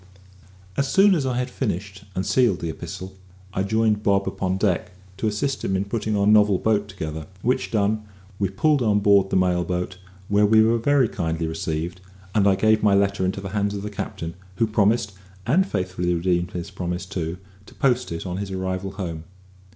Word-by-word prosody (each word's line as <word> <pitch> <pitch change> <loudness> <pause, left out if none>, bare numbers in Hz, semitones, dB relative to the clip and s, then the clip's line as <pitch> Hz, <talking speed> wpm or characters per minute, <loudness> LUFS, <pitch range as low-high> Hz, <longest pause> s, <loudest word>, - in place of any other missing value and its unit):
As 140 - +1
soon 195 +1 +6
as 145 -7 0
I 125 -2 -1
had 125 0 -2
finished 100 -3 -4
and 95 - -1
sealed 120 -6 +3
the 85 - -3
epistle, 95 +4 -7 0.4
I 95 - 0
joined 110 +1 +1
Bob 100 -1 +2
upon 95 0 -1
deck 95 -1 0 0.2
to 110 - -1
assist 120 +6 -1
him 95 - 0
in 95 +1 0
putting 110 0 -1
our 100 - +2
novel 105 -2 +5
boat 105 0 +1
together, 80 -6 -6 0.2
which 130 +1 +1
done, 105 0 0 0.3
we 100 -2 +1
pulled 145 +9 +2
on 105 -3 +3
board 100 -1 +4
the - - -1
mail 90 -1 +2
boat, 90 +1 -3 0.3
where 105 0 +4
we 110 +1 +6
were 115 +1 +3
very 140 +1 +3
kindly 80 -4 -2
received; 80 +2 -3 0.3
and 100 -2 +3
I 95 - +5
gave 110 +2 +3
my 100 -2 +4
letter 100 -1 +2
into 95 +1 -2
the 95 - -5
hands 100 0 -1
of 100 - -5
the 105 - -5
captain, 85 -4 -5 0.2
who 115 - +2
promised 110 0 +1 0.3
(and 180 - +3
faithfully 90 - -1
redeemed 85 0 0
his 85 -1 -5
promise 90 +1 -4
too) 90 -3 -4 0.3
to - - -15
post 125 -6 +1
it 85 +2 -4
on 90 -1 -3
his 100 0 -4
arrival 95 0 -3
home. 85 -5 -5
100 Hz, 195 wpm, -23 LUFS, 90-110 Hz, 0.4 s, soon